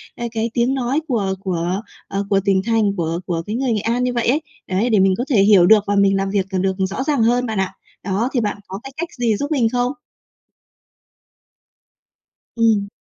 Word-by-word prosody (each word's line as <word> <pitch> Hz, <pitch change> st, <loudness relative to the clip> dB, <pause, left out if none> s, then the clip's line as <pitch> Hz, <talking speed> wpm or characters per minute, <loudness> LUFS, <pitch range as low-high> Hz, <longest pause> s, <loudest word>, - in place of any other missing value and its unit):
à, 240 Hz, -, -5 dB
cái 225 Hz, 0 st, -1 dB
tiếng 240 Hz, +2 st, +1 dB
nói 265 Hz, +3 st, 0 dB
của 205 Hz, -7 st, 0 dB
của, 180 Hz, 0 st, -2 dB, 0.3 s
ờ, 200 Hz, 0 st, -2 dB
của 195 Hz, -, +3 dB
tỉnh 195 Hz, -1 st, +3 dB
thành, 220 Hz, -3 st, +1 dB
của 165 Hz, 0 st, -1 dB
của 170 Hz, -2 st, -2 dB
cái 210 Hz, -, -3 dB
người 255 Hz, 0 st, 0 dB
Nghệ 210 Hz, -, -1 dB
An 235 Hz, +3 st, 0 dB
như 250 Hz, 0 st, 0 dB
vậy 240 Hz, -1 st, -1 dB
ấy, 280 Hz, +6 st, +2 dB, 0.3 s
đấy, 195 Hz, +6 st, 0 dB
để 215 Hz, -4 st, +3 dB
mình 190 Hz, 0 st, +4 dB
có 245 Hz, -, -1 dB
thể 230 Hz, -8 st, +4 dB
hiểu 200 Hz, -3 st, +6 dB
được 210 Hz, +2 st, +6 dB
và 205 Hz, -, +1 dB
mình 200 Hz, -1 st, +3 dB
làm 195 Hz, 0 st, -1 dB
việc, 195 Hz, -1 st, 0 dB
ờ, 190 Hz, -, 0 dB
được 190 Hz, 0 st, 0 dB
rõ 205 Hz, +7 st, -3 dB
ràng 280 Hz, -5 st, +1 dB
hơn 245 Hz, +2 st, +2 dB
bạn 220 Hz, -4 st, -2 dB
ạ. 190 Hz, 0 st, -1 dB, 0.3 s
Đó, 200 Hz, +6 st, -1 dB
thì 255 Hz, -, +2 dB
bạn 205 Hz, -1 st, -2 dB
có 190 Hz, +1 st, -6 dB
cái 270 Hz, -, -8 dB
cách 340 Hz, +1 st, -3 dB
gì 230 Hz, -3 st, +2 dB
giúp 285 Hz, +5 st, -4 dB
mình 250 Hz, -7 st, +2 dB
không? 245 Hz, +1 st, 0 dB, 2.6 s
Ừm. 220 Hz, -3 st, +2 dB
215 Hz, 220 wpm, -20 LUFS, 195-245 Hz, 2.6 s, hiểu